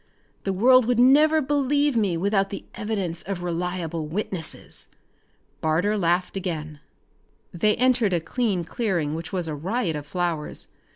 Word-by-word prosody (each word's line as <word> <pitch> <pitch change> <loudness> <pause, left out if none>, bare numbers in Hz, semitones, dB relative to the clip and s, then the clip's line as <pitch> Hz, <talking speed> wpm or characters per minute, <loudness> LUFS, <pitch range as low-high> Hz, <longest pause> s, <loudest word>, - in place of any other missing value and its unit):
The 195 - +1
world 250 +6 +5
would 245 0 +1
never 300 +5 +5
believe 285 0 +1
me 200 -7 +1
without 195 +2 +1
the 200 - -7
evidence 195 -6 -3
of 185 -2 -5
reliable 170 -2 -3
witnesses." 175 -1 -4 0.7
Barter 165 +7 +1
laughed 180 -1 +1
again. 155 -5 -4 0.7
They 210 +4 +2
entered 245 -5 +2
a 175 - +2
clean 200 0 -1
clearing 170 -5 -1
which 160 0 -5
was 180 -3 -1
a 155 - -3
riot 175 - -1
of 145 -1 -6
flowers. 170 -2 -3
190 Hz, 140 wpm, -24 LUFS, 165-230 Hz, 0.7 s, world